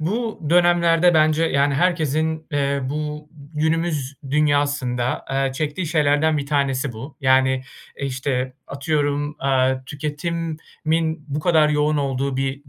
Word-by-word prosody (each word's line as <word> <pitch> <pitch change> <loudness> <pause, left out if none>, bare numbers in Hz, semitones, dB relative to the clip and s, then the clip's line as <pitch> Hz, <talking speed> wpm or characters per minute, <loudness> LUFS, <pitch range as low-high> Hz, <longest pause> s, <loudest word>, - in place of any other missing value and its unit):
bu 220 +8 -2
dönemlerde 175 0 +4
bence, 155 +1 +3
yani, 140 -2 +2
herkesin, 160 -1 0
eee, 140 -1 0
bu 150 +2 -4 0.3
günümüz 155 -3 -1 0.2
dünyasında, 145 -4 +1
eee, 135 0 0
çektiği 155 +5 -3
şeylerden 150 0 +2
bir 140 - -4
tanesi 140 -2 0
bu. 120 +7 -9
Yani, 130 -1 +3 0.4
eee, 140 - -2
işte 130 -1 -2
atıyorum, 145 +1 -1
aaa, 130 -1 +1
tüketimin 160 +1 -3
bu 145 +2 -2
kadar 160 -2 +4
yoğun 150 0 +1
olduğu 135 -1 -1
bir 135 +1 -3
145 Hz, 125 wpm, -22 LUFS, 135-160 Hz, 0.4 s, dönemlerde